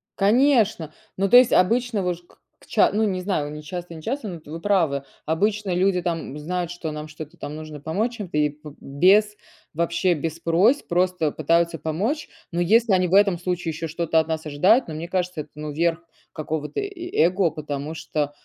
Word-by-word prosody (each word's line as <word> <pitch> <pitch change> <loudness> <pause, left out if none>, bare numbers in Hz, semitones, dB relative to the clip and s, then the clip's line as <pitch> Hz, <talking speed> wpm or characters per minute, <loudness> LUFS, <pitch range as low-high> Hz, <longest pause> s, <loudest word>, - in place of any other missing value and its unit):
конечно. 215 - +3 0.2
Ну, 195 +1 +1
то 245 - +9
есть 250 -1 +6
обычно, 230 +2 +2
вы 180 0 0
ж 170 - -17
к 175 - -25 0.2
к - - -20
ча - - +3
ну 220 +2 +2
не 185 -3 -1
знаю, 180 -6 -2
не 150 0 -8
часто, 175 +2 -7
не 160 - -10
часто, 255 - -3
но 180 - -5
вот 160 - -13
вы 165 +2 -7
правы. 165 -9 +1 0.2
Обычно 200 +4 0
люди 185 +1 +2
там 165 -5 -3
знают, 175 +3 -3
что 175 -2 -5
нам 150 0 -6
что-то 155 0 -10
там 145 - -7
нужно 155 -1 -8
помочь 215 +11 -2
чем-то, 185 -8 -4
и 150 0 +3
б 150 0 -12
без, 195 +9 +3 0.4
вообще, 170 +3 +1
без 160 +1 -4
просьб 185 - +2
просто 180 -3 +1
пытаются 165 +2 +1
помочь. 210 - -2 0.2
Но 170 0 -1
если 220 +4 +4
они 185 -1 +3
в 180 - +1
этом 200 -3 +4
случае 175 -2 -2
ещё 160 +1 -5
что-то 165 0 +1
от 160 - 0
нас 160 -1 -3
ожидают, 185 - +3
но 160 - -6
мне 160 +2 -5
кажется 180 -2 -2
это - - -12
ну, 150 0 -5
верх 165 +2 0 0.3
какого-то 155 -1 -4
и - - -2
и 360 -3 -7
эго. 180 +1 +2
Потому 150 0 -5
что, 150 -2 -2
170 Hz, 210 wpm, -23 LUFS, 155-195 Hz, 0.4 s, то